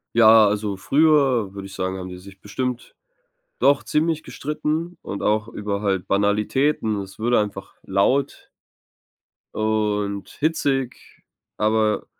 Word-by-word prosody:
Ja, 110 Hz, -1 st, +7 dB
also, 105 Hz, -1 st, -2 dB
früher, 135 Hz, -4 st, +3 dB
würde 100 Hz, -1 st, -8 dB
ich 95 Hz, -, -11 dB
sagen, 95 Hz, +1 st, -3 dB
haben 90 Hz, 0 st, -6 dB
die 90 Hz, -, -8 dB
sich 95 Hz, +1 st, -14 dB
bestimmt 125 Hz, +4 st, -4 dB, 0.7 s
doch 140 Hz, -1 st, +3 dB
ziemlich 160 Hz, 0 st, 0 dB
gestritten 155 Hz, +4 st, -3 dB
und 100 Hz, -, -6 dB
auch 110 Hz, +1 st, +1 dB
über 105 Hz, -1 st, -4 dB
halt 95 Hz, -3 st, -1 dB
Banalitäten. 105 Hz, +3 st, +1 dB
Es 95 Hz, +1 st, -11 dB
wurde 120 Hz, +2 st, 0 dB
würde -, -, +5 dB
einfach 100 Hz, -2 st, -9 dB
laut 115 Hz, +9 st, 0 dB, 1.1 s
und 105 Hz, -2 st, -1 dB
hitzig, 140 Hz, -5 st, -2 dB, 0.3 s
aber 110 Hz, 0 st, +1 dB
110 Hz, 130 wpm, -22 LUFS, 100-135 Hz, 1.1 s, Ja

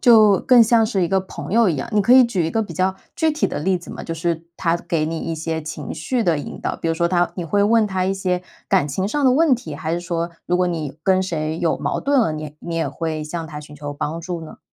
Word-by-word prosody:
就 215 Hz, -5 st, +6 dB
更 250 Hz, -3 st, +6 dB
像 225 Hz, 0 st, +4 dB
是 205 Hz, -4 st, 0 dB
一 170 Hz, -, -1 dB
个 190 Hz, -1 st, +2 dB
朋 185 Hz, -, -8 dB
友 230 Hz, -1 st, +5 dB
一 165 Hz, -, 0 dB
样， -, -, -4 dB
你 210 Hz, -, +3 dB
可 240 Hz, +5 st, +4 dB
以 260 Hz, 0 st, +9 dB
举 185 Hz, -8 st, 0 dB
一 -, -, -2 dB
个 225 Hz, +4 st, +1 dB
比 180 Hz, -, -7 dB
较 185 Hz, +3 st, +1 dB, 0.2 s
具 320 Hz, -1 st, +2 dB
体 310 Hz, -, +1 dB
的 -, -, -4 dB
例 185 Hz, +4 st, +1 dB
子 175 Hz, -, -11 dB
嘛？ -, -, -7 dB
就 165 Hz, -, -4 dB
是 165 Hz, 0 st, -2 dB
它 170 Hz, -1 st, +1 dB
给 170 Hz, -3 st, -1 dB
你 165 Hz, +1 st, -3 dB
一 165 Hz, 0 st, -3 dB
些 160 Hz, 0 st, -3 dB
情 155 Hz, -1 st, -6 dB
绪 225 Hz, +10 st, -1 dB
的 170 Hz, -6 st, +2 dB
引 145 Hz, -, -7 dB
导， -, -, -2 dB
比 -, -, -5 dB
如 165 Hz, -, +1 dB
说 170 Hz, +1 st, +1 dB
它 175 Hz, -1 st, +1 dB
你 175 Hz, -, -3 dB
会 200 Hz, +5 st, +1 dB
问 220 Hz, +1 st, +4 dB
它 190 Hz, -2 st, -1 dB
一 190 Hz, -, +1 dB
些 180 Hz, -2 st, -1 dB, 0.3 s
感 145 Hz, -, +3 dB
情 185 Hz, +8 st, -2 dB
上 290 Hz, +4 st, 0 dB
的 255 Hz, -, +6 dB
问 300 Hz, 0 st, +4 dB
题， 165 Hz, -12 st, -7 dB
还 160 Hz, +2 st, -3 dB
是 170 Hz, -, -1 dB
说 170 Hz, -1 st, -2 dB, 0.2 s
如 180 Hz, -, +2 dB
果 180 Hz, 0 st, +2 dB
你 160 Hz, -4 st, -4 dB
跟 190 Hz, +1 st, +3 dB
谁 160 Hz, -3 st, -2 dB
有 170 Hz, -, +1 dB
矛 -, -, -1 dB
盾 280 Hz, -2 st, +2 dB
了， 160 Hz, -9 st, +1 dB
你 155 Hz, -1 st, -6 dB
你 170 Hz, -, -5 dB
也 165 Hz, -, 0 dB
会 160 Hz, -2 st, -3 dB
向 165 Hz, +1 st, -5 dB
它 150 Hz, -2 st, -7 dB
寻 150 Hz, 0 st, -12 dB
求 145 Hz, 0 st, -6 dB
帮 155 Hz, +3 st, -4 dB
助 175 Hz, -1 st, -5 dB
呢？ -, -, -12 dB
175 Hz, 305 characters per minute, -21 LUFS, 160-205 Hz, 0.3 s, 以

